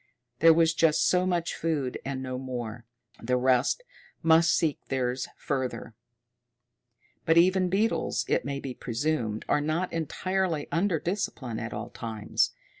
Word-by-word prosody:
There 165 Hz, +1 st, +8 dB
was 165 Hz, 0 st, +4 dB
just 160 Hz, -1 st, +3 dB
so 180 Hz, 0 st, +3 dB
much 175 Hz, -2 st, 0 dB
food 150 Hz, -6 st, -2 dB
and 135 Hz, -1 st, -4 dB
no 130 Hz, -1 st, -4 dB
more; 120 Hz, -3 st, -5 dB, 0.4 s
the 125 Hz, +2 st, +1 dB
rest 130 Hz, -, +2 dB, 0.4 s
must 165 Hz, +1 st, +5 dB
seek 155 Hz, -3 st, +1 dB
theirs 130 Hz, -1 st, -1 dB
further. 130 Hz, -4 st, -3 dB, 1.3 s
But 165 Hz, +1 st, +3 dB
even 185 Hz, +1 st, +4 dB
beetles, 210 Hz, +5 st, 0 dB
it -, -, +1 dB
may 140 Hz, 0 st, -3 dB
be 135 Hz, -2 st, -5 dB
presumed, 120 Hz, -3 st, -2 dB
are 145 Hz, -, +2 dB
not 155 Hz, +5 st, -1 dB
entirely 170 Hz, 0 st, -1 dB
under 170 Hz, 0 st, +1 dB
discipline 145 Hz, -, -3 dB
at 115 Hz, -, -5 dB
all 110 Hz, +3 st, -6 dB
times. 110 Hz, -3 st, -1 dB
145 Hz, 140 wpm, -28 LUFS, 125-170 Hz, 1.3 s, There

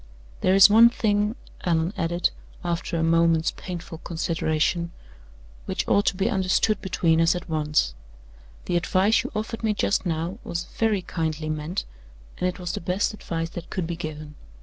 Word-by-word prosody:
There 185 Hz, -, +4 dB
is 195 Hz, 0 st, +10 dB
one 225 Hz, +3 st, +7 dB
thing," 210 Hz, -1 st, 0 dB, 0.3 s
Allan 165 Hz, +1 st, +1 dB
added, 170 Hz, +1 st, 0 dB, 0.3 s
after 170 Hz, 0 st, -2 dB
a 165 Hz, -, +1 dB
moment's 165 Hz, 0 st, +3 dB
painful 175 Hz, -3 st, -7 dB
consideration, 165 Hz, 0 st, -1 dB, 0.7 s
"which -, -, -2 dB
ought 205 Hz, -, +3 dB
to -, -, +3 dB
be 195 Hz, +3 st, 0 dB
understood 200 Hz, 0 st, +1 dB
between 165 Hz, -3 st, +2 dB
us 165 Hz, +2 st, +4 dB
at 175 Hz, -, -5 dB
once. 150 Hz, -2 st, +1 dB, 0.7 s
The 175 Hz, -, +1 dB
advice 190 Hz, +6 st, +3 dB
you 255 Hz, -, -6 dB
offered 220 Hz, +2 st, -3 dB
me 215 Hz, -1 st, +1 dB
just 200 Hz, -, +1 dB
now 170 Hz, +3 st, -2 dB
was 170 Hz, 0 st, -3 dB
very 215 Hz, -3 st, 0 dB
kindly 160 Hz, -3 st, -3 dB
meant, 155 Hz, +5 st, -3 dB, 0.5 s
and 180 Hz, -, +1 dB
it 180 Hz, -, -6 dB
was 175 Hz, -2 st, -4 dB
the -, -, -4 dB
best 185 Hz, +5 st, 0 dB
advice 165 Hz, -5 st, -4 dB
that 175 Hz, -1 st, -8 dB
could 185 Hz, -, -2 dB
be 170 Hz, +1 st, -3 dB
given. 155 Hz, -2 st, -7 dB
175 Hz, 170 wpm, -25 LUFS, 165-195 Hz, 0.7 s, is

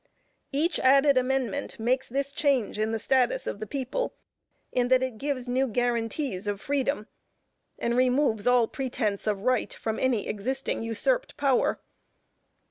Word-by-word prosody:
Each 315 Hz, +5 st, +1 dB
added 275 Hz, +2 st, +5 dB
amendment 265 Hz, +1 st, -1 dB
makes 250 Hz, +4 st, 0 dB
this 275 Hz, +2 st, -1 dB
change 270 Hz, -8 st, +1 dB
in 215 Hz, +1 st, 0 dB
the 225 Hz, -, 0 dB
status 250 Hz, +2 st, +1 dB
of -, -, -4 dB
the 215 Hz, -, -5 dB
People, 275 Hz, -, -3 dB, 0.6 s
in 245 Hz, -1 st, +1 dB
that 255 Hz, 0 st, +4 dB
it 250 Hz, -4 st, -4 dB
gives 275 Hz, -3 st, -2 dB
new 260 Hz, +2 st, +1 dB
guaranties 235 Hz, -2 st, -1 dB
of 205 Hz, -1 st, -1 dB
freedom, 275 Hz, -1 st, -1 dB, 0.7 s
and 235 Hz, 0 st, -1 dB
removes 250 Hz, -3 st, +2 dB
all 245 Hz, -2 st, +5 dB
pretense 240 Hz, -7 st, -2 dB
of 205 Hz, -2 st, -1 dB
right 255 Hz, -1 st, +1 dB
from 220 Hz, -1 st, -3 dB
any 250 Hz, -6 st, +1 dB
existing 260 Hz, +6 st, -2 dB
usurped -, -, 0 dB
power. 275 Hz, -3 st, +2 dB
255 Hz, 145 wpm, -27 LUFS, 225-275 Hz, 0.7 s, added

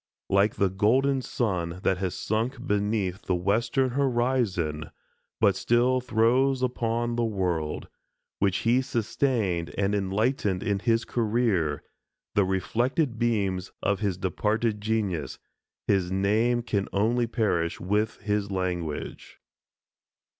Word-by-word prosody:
Like 100 Hz, +2 st, +3 dB
the 100 Hz, -2 st, +1 dB
golden 130 Hz, +8 st, +2 dB
sun 90 Hz, -9 st, -2 dB
that 95 Hz, -1 st, +1 dB
has 95 Hz, -2 st, -2 dB
sunk 120 Hz, +4 st, -2 dB
beneath 105 Hz, -4 st, 0 dB
the 90 Hz, -, +2 dB
western 115 Hz, +8 st, +1 dB
horizon, 120 Hz, -, 0 dB, 0.5 s
but 100 Hz, -4 st, +4 dB
still 125 Hz, +4 st, +2 dB
throws 125 Hz, +3 st, +2 dB
upon 120 Hz, -1 st, -1 dB
the 120 Hz, -, 0 dB
world, 90 Hz, -8 st, -2 dB, 0.5 s
which 95 Hz, -2 st, +2 dB
he 120 Hz, +3 st, +4 dB
sustained 110 Hz, -7 st, -1 dB
and 100 Hz, 0 st, +1 dB
enlightened 100 Hz, 0 st, 0 dB
in 100 Hz, -3 st, 0 dB
his 115 Hz, +2 st, +1 dB
career, 105 Hz, -10 st, 0 dB, 0.5 s
the 100 Hz, -, +3 dB
reflected 120 Hz, -, 0 dB
beams 100 Hz, -6 st, 0 dB
of 100 Hz, 0 st, +1 dB
his 100 Hz, -4 st, -1 dB
departed 105 Hz, +4 st, -1 dB
genius, 105 Hz, -7 st, -1 dB, 0.5 s
his 95 Hz, -3 st, +1 dB
name 110 Hz, +5 st, +2 dB
can 100 Hz, -4 st, -1 dB
only 115 Hz, +4 st, +1 dB
perish 100 Hz, -8 st, 0 dB
with 105 Hz, +4 st, -1 dB
his 105 Hz, -1 st, -1 dB
language. 90 Hz, -5 st, -4 dB
105 Hz, 120 wpm, -27 LUFS, 95-120 Hz, 0.5 s, but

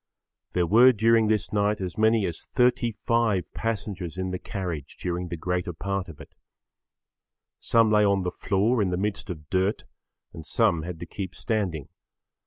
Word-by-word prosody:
There 90 Hz, -1 st, +2 dB
were 120 Hz, +9 st, +7 dB
during 115 Hz, 0 st, +3 dB
this 105 Hz, -1 st, 0 dB
night 105 Hz, 0 st, +1 dB
as 90 Hz, -3 st, -4 dB
many 110 Hz, -1 st, +3 dB
as 85 Hz, -3 st, -5 dB
35 115 Hz, -5 st, +1 dB
passengers 100 Hz, -6 st, -4 dB
in 95 Hz, 0 st, -2 dB
the 90 Hz, -, -3 dB
carriage 90 Hz, -8 st, -5 dB
during 90 Hz, 0 st, -3 dB
the 85 Hz, 0 st, -5 dB
greater 90 Hz, +1 st, -2 dB
part 95 Hz, +2 st, -3 dB
of 80 Hz, -, -11 dB
it. -, -, -13 dB, 1.3 s
Some 115 Hz, -2 st, +3 dB
lay 105 Hz, 0 st, +5 dB
on 100 Hz, -2 st, +2 dB
the 90 Hz, -, -2 dB
floor 105 Hz, +6 st, +1 dB
in 95 Hz, -, +1 dB
the 90 Hz, -, -1 dB
midst 100 Hz, +1 st, -3 dB
of 75 Hz, -4 st, -8 dB
dirt 95 Hz, +3 st, +1 dB, 0.5 s
and 80 Hz, -, -8 dB
some 80 Hz, +1 st, +2 dB
had 85 Hz, 0 st, -6 dB
to -, -, -4 dB
keep 95 Hz, -3 st, -6 dB
standing. 95 Hz, -, -2 dB
95 Hz, 170 wpm, -26 LUFS, 90-110 Hz, 1.3 s, were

